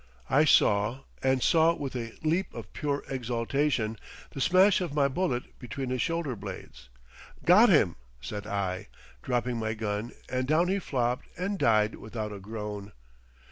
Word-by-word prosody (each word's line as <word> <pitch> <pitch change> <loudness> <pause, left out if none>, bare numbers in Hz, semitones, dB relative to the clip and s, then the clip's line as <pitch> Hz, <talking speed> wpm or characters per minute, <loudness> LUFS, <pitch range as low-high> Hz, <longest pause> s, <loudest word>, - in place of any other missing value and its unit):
I 150 +3 +5
saw, 105 -1 +3 0.2
and 130 -1 +2
saw 165 0 +4
with 140 -5 -5
a 115 -2 -4
leap 170 +5 0
of - - -8
pure 145 -1 -2
exaltation, 120 -1 -1 0.3
the 135 - -5
smash 185 +5 +5
of 165 -5 -3
my 140 -2 +4
bullet 130 -4 -2
between 125 +1 -5
his 130 -1 0
shoulder 165 -5 -1
blades. 65 - -9 0.6
"Got 210 +7 +7
him," 105 - +4 0.2
said 105 +7 -6
I, 95 -3 -2 0.3
dropping 120 - -1
my 110 -1 -2
gun 105 +1 -3 0.2
and 130 0 -2
down 165 +5 +3
he 195 +1 +1
flopped 125 -7 -1
and 195 +2 -2
died 110 -1 +3
without 110 -1 -6
a 100 - -7
groan. 105 0 -6
125 Hz, 155 wpm, -28 LUFS, 110-155 Hz, 0.6 s, Got